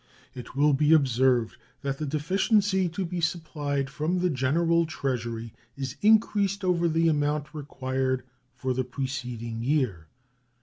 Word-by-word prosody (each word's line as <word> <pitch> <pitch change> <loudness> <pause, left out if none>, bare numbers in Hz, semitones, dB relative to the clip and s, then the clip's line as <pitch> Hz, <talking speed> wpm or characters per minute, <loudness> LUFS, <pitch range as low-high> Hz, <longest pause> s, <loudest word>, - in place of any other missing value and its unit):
It 125 0 -9
will 145 +1 +4
be 150 +3 +4
observed 130 -5 +3 0.3
that 135 -1 -2
the 155 - -2
deficiency 190 - +1
to 180 +3 -3
be 175 0 -4
supplied 150 -4 -2
from 155 +5 -1
the 180 0 +1
General 165 +5 +2
Treasury 115 -6 -3 0.2
is 135 -1 -4
increased 205 -2 +3
over 175 -2 +2
the 165 0 +2
amount 150 -1 0
required 130 -3 -2 0.3
for 130 -1 -2
the 130 +1 0
preceding 125 -3 -4
year. 120 - 0
145 Hz, 135 wpm, -27 LUFS, 130-170 Hz, 0.3 s, will